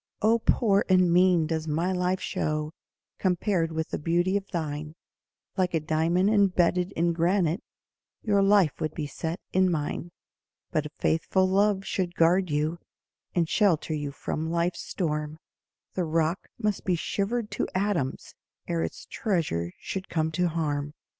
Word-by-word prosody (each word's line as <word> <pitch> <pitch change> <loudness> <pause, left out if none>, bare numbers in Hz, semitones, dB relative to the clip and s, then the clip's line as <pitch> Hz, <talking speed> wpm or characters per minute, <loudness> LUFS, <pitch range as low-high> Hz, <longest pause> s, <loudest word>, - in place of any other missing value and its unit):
Oh, 225 +2 +4
poor 205 -3 +3
and 185 -2 +5
mean 180 -2 +5
does 160 0 -2
my 165 +5 0
life 180 0 0
show 155 -2 -2 0.5
Compared 180 -2 +1
with 160 0 -3
the - - -3
beauty 175 +5 +1
of 200 -1 -1
thine, 155 -2 -4 0.6
Like 180 -2 +1
a - - +3
diamond 165 +5 +2
embedded 185 -3 +3
in 170 +1 +1
granite 175 +2 +1 0.6
Your 200 -2 +3
life 195 -6 +3
would 155 -1 -2
be 155 - -3
set 160 +4 -4
in 185 0 +4
mine; 160 +1 -2 0.6
But 150 -1 0
a - - -16
faithful 185 +4 +2
love 195 +1 +2
should 180 -2 -2
guard 175 +2 +3
you, 155 +3 0 0.6
And 170 -2 +2
shelter 170 -5 +2
you 145 -2 -3
from 155 +3 -3
life's 170 +1 0
storm, 150 -3 -3 0.6
The 180 - -1
rock 165 +2 0
must 210 -4 -1
be 180 - +1
shivered 210 +6 -2
to - - -1
atoms 185 -9 -1 0.3
Ere 85 - 0
its 80 - -4
treasure 155 - -1
should 190 -1 -5
come 160 -1 0
to 180 +3 +1
harm. 150 -3 -2
170 Hz, 155 wpm, -27 LUFS, 155-190 Hz, 0.6 s, and